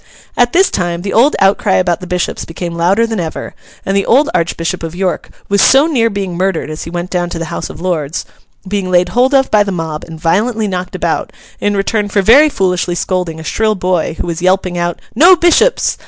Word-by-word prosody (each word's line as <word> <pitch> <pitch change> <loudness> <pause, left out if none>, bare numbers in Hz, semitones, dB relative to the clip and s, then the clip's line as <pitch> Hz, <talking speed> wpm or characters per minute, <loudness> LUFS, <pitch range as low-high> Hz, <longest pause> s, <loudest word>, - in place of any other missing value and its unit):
At 245 0 +2
this 380 +5 +3
time, 175 -1 -2
the 195 - -3
old 260 +7 +4
outcry 195 - +2
about 165 - +1
the 180 - -9
Bishops 180 0 -2
became 170 +1 -6
louder 180 +7 +2
than 225 -3 -3
ever, 165 -2 -5 0.3
and 195 - -1
the 200 - 0
old 280 +5 +3
Archbishop 170 +1 -1
of 165 0 -6
York 185 0 -2 0.2
was 200 0 +2
so 270 +3 +5
near 245 -8 +1
being 195 -4 -4
murdered 180 -4 -1
as 155 - -6
he - - -7
went 175 +1 -5
down 175 -1 -1
to 170 - -5
the 165 -1 -5
House - - -4
of - - -10
Lords—being 185 +3 -4
laid 180 0 +2
hold 255 +4 +2
of 270 -1 +2
by 210 - +4
the 205 -1 0
mob 160 -4 -4
and 160 -1 -10
violently 215 +7 0
knocked 185 -2 -4
about, - - -2 0.3
in 205 0 0
return 205 +1 -1
for 200 -1 +1
very 280 +10 +6
foolishly 180 - -1
scolding 175 -2 -2
a - - -8
shrill 215 +5 0
boy 180 -4 -1
who - - -2
was 170 -1 -4
yelping 185 0 +1
out 175 -1 -2
'No 355 +5 +6
Bishops! 350 +8 +2
185 Hz, 215 wpm, -14 LUFS, 175-215 Hz, 0.3 s, very